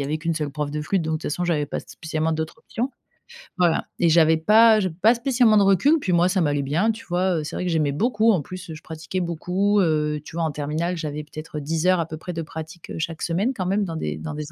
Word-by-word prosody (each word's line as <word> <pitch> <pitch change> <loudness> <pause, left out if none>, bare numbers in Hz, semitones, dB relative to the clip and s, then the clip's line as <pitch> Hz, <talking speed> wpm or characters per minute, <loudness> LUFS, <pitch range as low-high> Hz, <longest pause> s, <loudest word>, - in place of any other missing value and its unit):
y - - 0
avait 145 +3 -1
qu'une 165 +1 -2
seule 150 -2 -2
prof 150 0 -3
de 150 +1 -3
flûte 170 +4 0
donc 160 0 -1
de 155 - -1
toute - - -4
façon 175 +4 -2
j'avais 155 -4 0
pas - - -4
spécialement 160 -1 -3
d'autres 160 +4 -3
options, 240 +3 -4 0.7
voilà. 175 -3 +2
Et 170 - +4
j'avais 160 0 +5
pas 220 +5 +6
j'avais 185 -4 -2
pas 225 +5 +6
spécialement 240 -3 +3
de 205 - +5
recul 200 - +4
puis 185 - -1
moi 175 +1 +4
ça 185 0 +1
m'allait 145 -3 +1
bien 165 +11 +1
tu 225 +1 -9
vois, 180 0 0
heu, 155 - -4
c'est - - -6
vrai 180 - -3
que 175 - 0
j'aimais 155 -3 +1
beaucoup 225 - +2
en 180 - +1
plus 185 +2 -9
je 155 - -10
pratiquais 160 +3 -5
beaucoup 180 +5 0
heu, 150 -4 +1
tu - - -10
vois 170 - -1
en 160 - 0
terminale 155 +5 -2
j'avais 150 -1 -4
peut-être 155 +1 -8
10 160 +4 -1
heures 185 -2 +4
à - - -2
peu 155 0 -7
près 180 +3 -7
de 165 - -3
pratique, 160 +1 -9
heu, - - -6
chaque 160 0 -4
semaine 195 +10 0
quand 185 -4 -3
même 200 +2 +1
dans 165 -3 -5
des 75 - -3
dans 80 - -6
des 150 0 -6
165 Hz, 275 wpm, -23 LUFS, 155-190 Hz, 0.7 s, pas